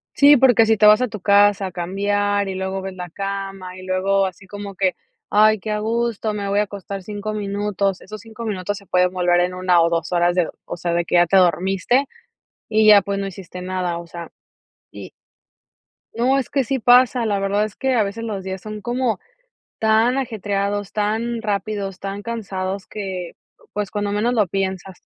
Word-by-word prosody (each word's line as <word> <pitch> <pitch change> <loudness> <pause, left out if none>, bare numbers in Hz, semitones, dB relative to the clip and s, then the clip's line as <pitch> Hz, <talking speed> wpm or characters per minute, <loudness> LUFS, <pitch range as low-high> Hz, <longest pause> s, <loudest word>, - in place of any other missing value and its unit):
Sí, 290 0 +7
porque 245 -3 +5
si 220 - +3
te 210 - +2
vas 210 +2 +7
a 250 - +1
tu 215 -1 -8
casa 200 0 +4
a 185 - -7
cambiar, 200 +3 0
y 190 - -3
luego 190 0 -3
ves 190 0 -6
la 180 -1 -7
cama, 195 0 -5
y - - -10
luego 190 +1 +1
así 190 +1 -9
como 205 0 -8
que, 185 -1 +1 0.4
ay, 215 +1 +5
qué 215 +3 -6
a 210 - 0
gusto, 225 -1 -1
me 205 -1 -3
voy 200 - +1
a 210 - +3
acostar 200 -1 -7
5 210 +2 -5
minutos. 200 -2 -2
Esos 215 +2 -9
5 225 +2 -9
minutos 205 -2 -3
se 200 - -12
pueden 180 0 +2
volver 175 -1 +2
en 180 +1 0
una 180 -1 +3
o 165 - +4
2 170 +1 -2
horas 175 0 +2
de 175 -3 +1 0.2
o - - -5
sea, 170 0 -2
de 170 0 0
que - - -3
ya 175 0 +6
te 195 +3 +4
dormiste 190 - +2 0.7
y 215 0 +3
ya, 205 -1 +8
pues, 200 -1 -3
no 195 - -2
hiciste 180 -1 -9
nada. 180 -2 -2
O 170 - -9
sea, 170 0 -9 0.6
y - - -10 1.0
no, 250 +4 +2
es 265 - -2
que 275 -3 0
sí 265 +1 -1
pasa, 245 0 +5
la 205 -2 0
verdad 200 +1 +1
es 215 -1 -5
que 265 -1 0
a 220 - +3
veces 215 +3 -5
los 200 -4 -4
días 190 0 -5
son 215 -1 -7
como 245 -1 -1 0.6
tan 225 +4 +3
ajetreados, 205 -4 -2
tan 225 +2 -1
rápidos, 200 -2 -3
tan 200 +1 -5
cansados 195 -4 -4
que, 190 -4 -6 0.3
pues, 205 -1 -3
cuando 205 -1 -2
menos 220 +4 0
lo 215 -5 +2
piensas. 190 0 -4
200 Hz, 205 wpm, -21 LUFS, 185-215 Hz, 1.0 s, ya